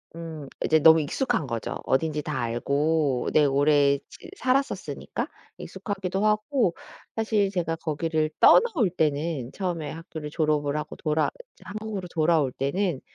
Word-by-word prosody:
음 160 -3 -7 0.2
이제 160 - +4
너무 160 +1 +7
익숙한 155 - -1
거죠 115 -3 -3
어딘지 150 +2 +1
다 150 -3 -4
알고. 140 +3 0
네 150 - +5
오래 140 0 +4
즈 - - -13
살았었으니까. 260 +2 -1 0.3
익숙하기도 195 -2 -4
하고 215 - +1 0.4
사실 220 -3 +1
제가 170 -4 -2
거기를 155 0 -1
떠나올 375 - +6
때는 150 -5 -1
처음에 175 -6 -3
학교를 160 -1 -7
졸업을 150 -2 0
하고 150 0 -5
돌아 155 0 +1 0.3
이제 - - -19
한국으로 205 -1 -5
돌아올 155 -4 +2
때는 145 +4 -1
160 Hz, 315 characters per minute, -26 LUFS, 145-190 Hz, 0.4 s, 너무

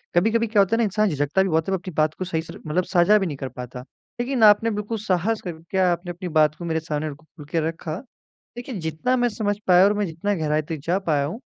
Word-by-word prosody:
कभी-कभी 225 +6 +3
क्या 210 -2 +4
होता 195 +3 +2
है - - 0
ना 235 - +2
इंसान 210 0 +1
झिझकता 145 +5 +1
भी 190 - -1
बहुत 160 0 +1
है 195 - -1
वो 190 - +2
अपनी 185 0 -9
बात 155 0 +2
को 185 - -2
सही 165 -3 -1
से 160 - -10
मतलब 175 +4 +1
साझा 180 +4 +5
भी 195 - 0
नहीं 150 -6 -4
कर 135 -1 -5
पाता। 125 0 -8 0.4
लेकिन 245 -1 0
आपने 215 +2 +6
बिल्कुल 210 +2 -3
साहस 215 +2 0
करके 170 +1 -6
आपने 175 -1 +1
अपनी 180 +1 -6
बात 150 -1 +4
को 170 - -8
मेरे 160 -1 0
सामने 155 -1 -3
खुल 155 0 -15
के 165 - +1
रखा, 165 -1 -4 0.6
देखिए 245 +1 -6
जितना 160 +11 0
मैं 245 -1 +2
समझ 205 -2 -1
पाया 180 0 +7
और 205 - +4
मैं 210 0 0
जितना 175 +4 -2
गहराई 155 -2 0
तक 160 +1 -5
जा 180 +3 +1
पाया 145 -3 +2
हूँ। 170 +11 -5
180 Hz, 255 wpm, -23 LUFS, 160-210 Hz, 0.6 s, पाया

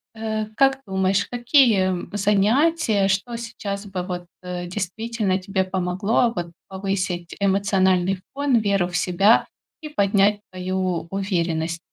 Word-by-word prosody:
А, 220 -1 -2
как 270 +1 +3
думаешь, 190 0 +1
какие, 245 -2 +4
м, 180 -2 -3
занятия, 210 - +2
что 200 +5 -1
сейчас 210 -3 -5
бы 190 -2 -4
вот, 180 -1 -5 0.2
а, 180 -1 -5
действительно 195 +3 -2
тебе 190 0 -1
помогло, 190 +5 0
вот, 170 -1 -4 0.2
повысить 190 -3 -3
эмоциональный 190 -2 +2
фон, 280 -3 +2
веру 200 -4 +1
в 175 - -2
себя 195 +5 +3 0.3
и 305 - -7
поднять 200 -4 +2
твою 185 -2 -2
уверенность? 170 -4 -1
195 Hz, 125 wpm, -23 LUFS, 185-220 Hz, 0.3 s, какие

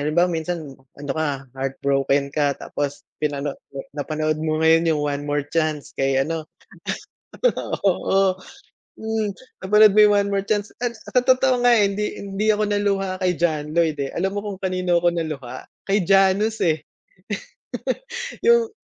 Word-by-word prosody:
Halimbawa 170 +5 +2
minsan 165 0 -3 0.3
ano 140 0 -7
ka, 145 -4 -2
heartbroken 135 +1 0
ka, 145 -2 +1
tapos 145 -1 -4 0.2
pinano 145 -1 -1 0.4
napanood 155 +1 -2
mo 155 0 -1
ngayon 165 +1 +5
yung - - -2
One 145 -1 -2
More 145 -1 0
Chance, 155 -1 -2
kay 135 0 0
ano. 160 0 -4 1.4
Oo. 190 0 +2 0.6
Mm. 220 -1 -1 0.3
Napanood 210 +1 +6
mo - - +6
yung 205 0 +5
One 200 0 0
More 195 0 0
Chance, 205 0 -1
at 240 -1 0
sa 250 +3 0
totoo 255 -1 +3
nga, 245 - +6
eh, 210 - +5
hindi 210 +1 -3
hindi 200 +2 -2
ako 215 0 +1
naluha 200 -2 0
kay 180 -1 +2
John 155 -3 0
Lloyd, 165 -3 +2
eh. 135 - -3
Alam 190 +2 -1
mo - - +1
kung 200 -2 -5
kanino 185 -2 +1
ako 175 0 +3
naluha? 140 -7 -4 0.2
Kay 200 +1 +2
Janus, 195 +4 +3
eh. 160 -3 +1 1.6
Yung 470 -1 +4
170 Hz, 155 wpm, -22 LUFS, 150-200 Hz, 1.6 s, Napanood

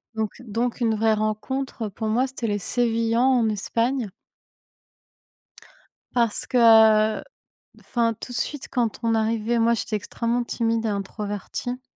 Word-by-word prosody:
Donc 220 -2 -1
donc 235 +2 -3
une 225 -2 +2
vraie 220 +1 +2
rencontre, 215 +4 -2
heu, 210 - -4
pour 220 +3 -5
moi, 245 +5 +1
c'était 260 -3 -4
les 205 -1 -1
Sévillans 230 +1 +1
en 255 -4 +3
Espagne. 230 +3 -1 2.0
Parce 235 -3 +1
que, 220 -3 +5 0.6
enfin 230 -2 0
tout - - -7
de - - -3
suite 285 +4 -3
quand 235 -4 -1
on 230 -1 +1
arrivait 225 +1 0
moi 230 +1 +3
j'étais 220 -1 -2
extrêmement 235 +4 -2
timide 230 -1 -1
et - - +1
introvertie. 205 +4 -4
230 Hz, 140 wpm, -24 LUFS, 215-240 Hz, 2.0 s, que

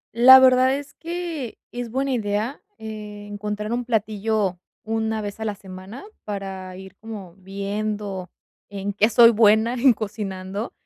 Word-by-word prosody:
La 255 +3 +10
verdad 260 0 +5
es 285 0 -7
que 335 -7 -5
es 245 -1 -5
buena 270 +3 -1
idea, 220 +2 -2 0.2
eh, 210 -1 -8
encontrar 210 +1 -4
un 245 +1 -1
platillo 215 -4 -1 0.2
una 220 -1 -1
vez 205 +1 -6
a 220 - -3
la 210 -2 -2
semana 190 +4 -10 0.2
para 190 -2 -6
ir 190 0 -11
como 210 -6 -9
viendo 200 0 -4 0.4
en 200 0 -4
qué 210 +2 +3
soy 235 0 +7
buena 220 +1 +4
en 250 +1 +5
cocinando, 200 -1 -5
215 Hz, 145 wpm, -23 LUFS, 200-235 Hz, 0.4 s, La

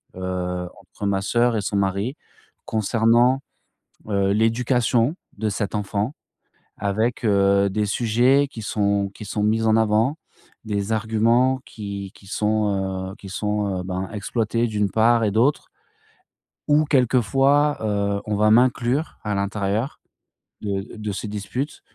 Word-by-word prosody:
heu, 90 -1 -3
entre 105 - -8
ma 100 -1 +1
sœur 120 +4 +2
et - - 0
son 100 - -3
mari 100 +7 -1 0.5
concernant, 115 +4 +2 0.7
heu, 100 -1 +1
l'éducation 120 +4 +2 0.2
de 110 +1 -1
cet 105 +1 -3
enfant 105 +4 -2 0.7
avec, 110 +5 -1
heu, 100 -1 +3
des 105 +1 0
sujets 125 +6 +3
qui 110 -5 -8
sont 100 -1 0
qui - - -9
sont 105 +1 -3
mis 110 +1 +2
en 110 0 +4
avant, 110 +6 +2 0.5
des 105 0 -2
arguments 115 +4 +2
qui 100 -2 -7
qui 100 - -18
sont, 100 -3 -1
heu, - - -10
qui 100 - -11
sont, 105 -1 -2
heu, - - -4
ben, 95 0 -3
exploités 115 +2 -1
d'une 105 -3 0
part 115 +2 +3
et 105 - +2
d'autre 120 +7 +2 1.0
où 150 +1 +5
quelquefois, 135 +2 +3
heu, 100 -1 0
on 105 - -1
va 105 +1 +3
m'inclure 125 +5 +2
à 105 - -2
l'intérieur 100 +5 -2 0.6
de 100 -2 -2
d 105 - -11
de 105 -1 -4
ces 100 +2 -5
disputes 105 +8 -4
105 Hz, 140 wpm, -23 LUFS, 100-120 Hz, 1.0 s, où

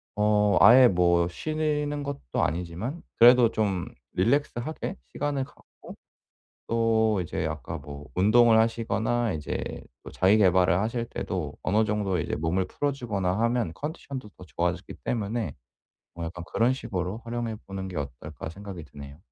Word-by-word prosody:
어 105 0 +3
아예 125 +1 +9
뭐 85 -3 +3
쉬는 150 - -2
것도 140 - -3
아니지만 90 - -3 0.2
그래도 120 -1 +7
좀 95 -5 0 0.3
릴렉스 120 +6 +1
하게 155 +8 -4 0.2
시간을 145 -2 -1
갖고 - - -15 0.7
또 110 -3 +2
이제 85 - -3
아까 - - -5
뭐 75 0 -9
운동을 110 +4 +5
하시거나 115 0 +1
이제 75 -1 -4 0.2
또 - - -9
자기 95 +3 +4
계발을 90 -3 +4
하실 115 +2 -1
때도 - - -4
어느 110 +4 +2
정도 100 -4 0
이제 - - -2
몸을 85 +4 0
풀어 145 +8 -1
주거나 100 -8 -2
하면 115 -6 +1
컨디션도 140 - -6
더 90 - -12
좋아지기 70 - -3
때문에 110 - -2 0.6
뭐 85 -1 -5
약간 85 +1 -6
'그런 120 +3 +2
식으로 100 -3 -4
활용해 115 -1 -3
보는 95 -1 -5
게 90 - -7
어떨까.' 70 +1 -6
생각이 95 -2 -8
드네요. 70 +1 -11
105 Hz, 315 characters per minute, -27 LUFS, 90-120 Hz, 0.7 s, 아예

